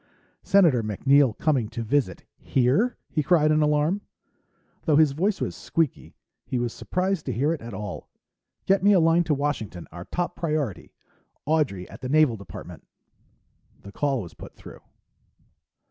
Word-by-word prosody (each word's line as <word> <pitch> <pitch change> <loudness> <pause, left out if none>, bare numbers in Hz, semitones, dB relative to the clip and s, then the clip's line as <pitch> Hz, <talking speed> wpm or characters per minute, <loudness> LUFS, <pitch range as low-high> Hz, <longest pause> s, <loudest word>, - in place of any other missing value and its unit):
"Senator 175 -11 +4
MacNeill 130 +4 +2
coming 135 -9 +1
to 115 0 -5
visit 115 -6 -1
here?" 140 - +1
he 155 - -1
cried 155 -1 +3
in 155 0 +3
alarm. 150 +6 +1 0.8
Though 155 - +3
his 155 -1 +5
voice 190 +8 0
was - - -3
squeaky, 165 -4 -2 0.3
he 130 - -3
was 120 -1 -2
surprised 185 -2 -2
to - - 0
hear 140 +7 +1
it 160 - -6
at 115 -3 -8
all. 105 -1 -7 0.6
"Get 195 +1 +3
me 205 +2 +5
a 190 - +5
line 165 +1 +4
to 150 - +1
Washington, 125 - -3
our 85 +2 -9
top 175 0 -3
priority, 150 - -3 0.5
Audrey 145 - 0
at - - -13
the 130 - -4
Naval 150 -4 +4
Department." 100 -6 -11 1.0
The 100 - -10
call 135 -1 -1
was 85 - -11
put - - -12
through. - - -12
145 Hz, 160 wpm, -25 LUFS, 115-165 Hz, 1.0 s, his